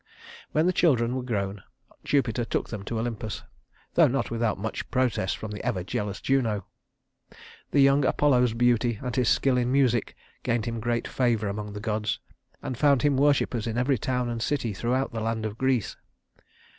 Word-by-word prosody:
When 155 +2 +2
the 185 - +3
children 125 -9 +2
were 130 - -1
grown, 100 -5 -3 0.4
Jupiter 125 -5 +1
took - - -2
them 105 -3 -5
to 115 - -3
Olympus, 110 -2 -4 0.5
though - - +6
not 125 -2 -1
without 115 -2 0
much 105 +3 -4
protest 125 -7 0
from 110 - -6
the 105 - -6
ever 90 - -1
jealous 100 +2 -3
Juno. 115 -8 0 1.0
The 140 - +3
young 140 +1 +5
Apollo's 125 -4 +3
beauty 120 -1 +2
and 125 -2 -3
his 125 -2 +2
skill 135 -2 +3
in 125 0 0
music 130 -4 +2 0.3
gained 115 -2 0
him 115 -1 -3
great 120 +1 -1
favor 115 -5 +1
among 105 +1 -4
the 105 - -5
gods, 105 0 -1 0.5
and 130 - -3
found 140 -3 +4
him 145 -2 +3
worshipers 135 -5 +2
in 115 0 -2
every 125 0 +2
town 125 +2 -1
and 115 -1 -3
city 120 -5 -1
throughout 125 +6 -1
the 115 - -3
land 110 0 -2
of 110 +1 -5
Greece. 130 -5 +1
120 Hz, 180 wpm, -26 LUFS, 110-130 Hz, 1.0 s, though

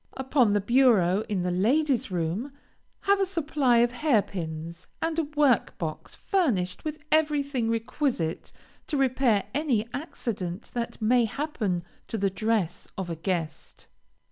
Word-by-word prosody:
Upon 260 -5 +2
the 205 - +2
bureau 215 -5 +4
in 195 -4 0
the 180 - 0
ladies' 255 - +2
room, 180 - -2 0.5
have 400 0 +3
a 390 - +3
supply 295 -8 +1
of 240 - -4
hair 245 -4 +2
pins, 165 -1 -6
and 325 0 -1
a 325 - +1
workbox 265 - 0
furnished 230 - 0
with 310 -1 -4
everything 285 -6 +2
requisite 230 - -1 0.4
to 300 - -1
repair 255 -5 +2
any 265 -7 +1
accident 210 - -5
that 235 -1 -3
may 240 +2 +4
happen 215 - -2 0.2
to 225 - -3
the 195 -1 +1
dress 205 -3 -1
of 185 -3 -3
a - - -2
guest. 165 -2 -4
230 Hz, 140 wpm, -27 LUFS, 185-285 Hz, 0.5 s, bureau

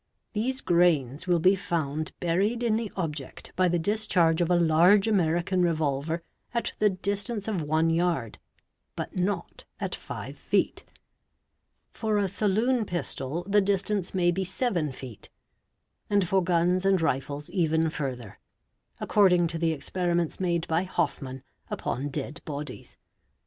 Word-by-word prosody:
These 255 +5 -1
grains 165 -4 +2
will 175 -1 +4
be 185 +4 +4
found 155 -5 -2
buried 200 +8 +1
in 225 -2 +2
the 225 -2 -2
object 150 -7 -5
by 185 0 +3
the 175 0 +2
discharge 180 -3 +2
of 170 - +1
a 180 - +4
large 175 +5 +5
American 180 -2 +2
revol 155 -5 +1
ver 165 +2 -3 0.3
at 235 - -1
the 210 - +5
distance 200 +3 -3
of 200 -6 -1
one 155 +2 +2
yard, 165 -9 0 0.6
but - - -5
not 180 -1 -2 0.2
at - - -3
five - - -7
feet; - - 0 1.1
for 215 -2 -1
a 200 -1 +2
saloon 220 +6 +1
pistol 170 -4 -3
the 205 +1 +4
distance 195 -1 0
may 175 -1 +3
be 190 +2 -1
seven 185 - -1
feet; 125 -5 -10 0.8
and 200 -3 +2
for 190 +1 +2
guns 175 +1 +2
and 195 -1 +3
rifles 145 +1 -2
even 160 -3 +1
further, 125 -8 -5 0.6
according 180 -4 +4
to 165 0 -3
the 165 -1 +2
experiments 170 +2 -1
made 170 -3 0
by 165 +1 +2
Hofmann 140 -7 -2 0.3
upon 135 +5 -3
dead 145 +2 -5
bodies. 150 0 -7
175 Hz, 145 wpm, -27 LUFS, 155-195 Hz, 1.1 s, large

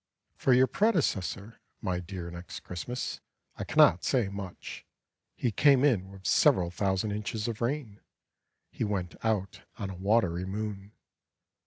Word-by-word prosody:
For 135 - +1
your 130 +1 +6
predecessor, 120 - 0 0.2
My 90 -1 -1
dear 90 -1 -6
Next 85 0 -8
Christmas, 120 +8 -5 0.4
I - - -3
cannot 90 - +5
say 120 -7 +1
much. 100 -2 -7 0.5
He 120 - 0
came 140 +3 +5
in 100 -9 +2
with 95 -1 -13
several 90 -2 +4
thousand 95 +3 0
inches 105 +1 -3
of 115 -1 -4
rain; 120 -4 -2 0.7
He - - -3
went 100 -5 -2
out 105 -4 -1 0.2
on 100 -3 -4
a - - -7
watery 95 -2 +1
moon. 100 +1 -5
100 Hz, 140 wpm, -29 LUFS, 95-115 Hz, 0.7 s, your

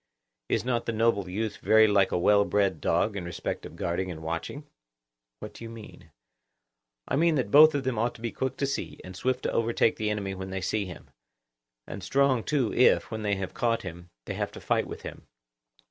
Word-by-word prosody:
Is - - 0
not 120 -2 -1
the 115 - 0
noble 110 -4 +1
youth 110 +4 -3
very 110 0 +5
like 100 -2 +3
a - - +1
well 100 +3 +4
bred 100 -5 0
dog 100 +5 +1
in 100 - -4
respect 85 0 -4
of - - -14
guarding 90 +2 -2
and 80 -2 -7
watching? 85 - -4 0.7
What - - -9
do - - -11
you 115 - -7
mean? 115 -2 -12 1.0
I - - 0
mean 165 +2 +3
that 125 -8 -1
both 155 +1 +8
of 140 - -1
them 130 -4 -1
ought 120 +1 0
to 115 - -13
be 115 -1 -3
quick 130 -1 -3
to 140 - 0
see, 140 - -4
and 95 0 -9
swift 130 +6 -1
to - - -1
overtake 115 0 +1
the 105 -1 -1
enemy 100 -2 -2
when 95 0 -6
they 95 0 -3
see 100 +2 -1
him; 90 -2 -11 0.7
and 95 0 -8
strong 135 -2 +2
too 140 -6 0
if, 125 - +4
when 110 -1 -4
they 105 -1 0
have 95 -1 -5
caught 115 -1 0
him, 90 -1 -9 0.2
they - - -4
have - - -3
to - - -8
fight - - 0
with - - -8
him. - - -9
110 Hz, 220 wpm, -27 LUFS, 95-120 Hz, 1.0 s, both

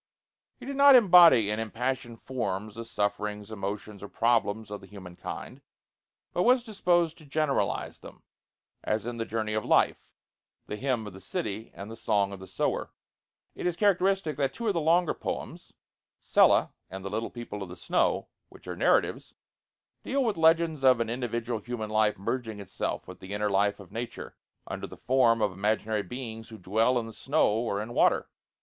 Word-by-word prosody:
He - - -11
did 275 0 -5
not 280 -1 +8
embody 170 - +7
in 105 - -1
impassioned 120 +1 -3
forms 105 -5 -3
the 115 +2 -7
sufferings, 105 -1 -2
emotions, 100 0 -5
or 100 - -7
problems 110 -2 +1
of 105 -1 -6
the 95 - -13
human 95 -4 -11
kind, - - -7 0.7
but 175 - +1
was 250 +4 +4
disposed 175 -7 +1
to 155 - -15
generalize 150 0 -1
them, - - -13 0.6
as 105 0 -1
in 120 0 -4
'The 115 - -2
Journey 110 -1 -2
of 110 0 -1
Life,' - - +1 0.5
the - - -5
'Hymn 125 -1 -1
of 105 - -8
the 95 - -12
City,' 105 +3 -4
and 100 +3 -8
'The 115 - -8
Song 100 -3 +1
of 100 - -8
the 95 - -10
Sower,' - - -1 0.6
it - - -3
is 175 - 0
characteristic 195 -4 +2
that 135 -2 0
two 235 - -4
of 205 - +2
the 170 - 0
longer 165 +2 +3
poems, - - -6 0.5
'Sella' - - +4 0.2
and 95 +1 -8
'The 100 - -4
Little 110 +2 -2
People 120 -4 -7
of 95 - -6
the 90 - -8
Snow,' - - 0 0.2
which - - -17
are - - -4
narratives, - - +1 0.7
deal 275 +1 0
with 225 -4 0
legends 160 -2 +3
of 130 -2 +6
an 115 -1 -1
individual 120 -1 -2
human 110 -1 -5
life 110 0 +2
merging 110 +2 -3
itself 100 - -4
with - - -10
the 95 +2 -6
inner 105 0 0
life 100 +1 +1
of 95 -3 -13
nature, 115 +2 -6 0.3
under - - -5
the - - -12
form 120 -3 +3
of 105 - +1
imaginary 105 +2 0
beings 115 -1 -7
who 110 - -10
dwell 110 +6 +1
in 120 - -1
the 115 - -9
snow 135 -2 +1
or 115 -3 -1
in 110 +3 -5
water. - - +3
115 Hz, 185 wpm, -28 LUFS, 105-135 Hz, 0.7 s, not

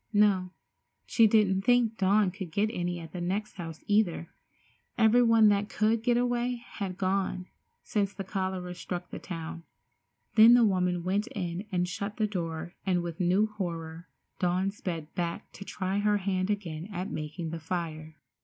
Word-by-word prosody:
No, 200 -3 +3 0.6
she 225 -2 +5
didn't 205 -3 +3
think 235 0 +2
Dawn 195 0 +3
could 190 -3 -7
get 210 +5 +1
any 175 -2 -2
at 165 -2 -9
the 180 - -5
next 195 +5 -2
house 165 -3 -7
either. 205 -6 +1 0.7
Everybody 230 0 +5
that 205 0 +1
could 220 +1 +1
get 240 +1 +2
away 245 0 +1
had 200 -6 -6
gone 190 -1 -1 0.4
since 200 -2 0
the 195 - -6
cholera 185 -2 -3
struck 180 0 -6
the - - -6
town. 165 -2 -6 0.7
Then 230 +2 +8
the 240 -2 +6
woman 180 -3 +1
went 200 +5 0
in 180 +1 -3
and 180 -1 +1
shut 200 +3 -4
the 215 - +2
door 170 -4 -4
and 180 -3 +1
with 170 -2 -6
new 185 +4 +3
horror 170 -5 -5 0.3
Dawn 185 +2 +1
sped 165 -6 -5
back 170 -1 -3
to - - -9
try 195 0 -2
her 210 0 +3
hand 185 -1 -1
again 180 -4 -3
at 185 -1 -4
making 155 +2 -4
the 165 - -4
fire. 160 -2 -4
190 Hz, 165 wpm, -29 LUFS, 175-210 Hz, 0.7 s, Then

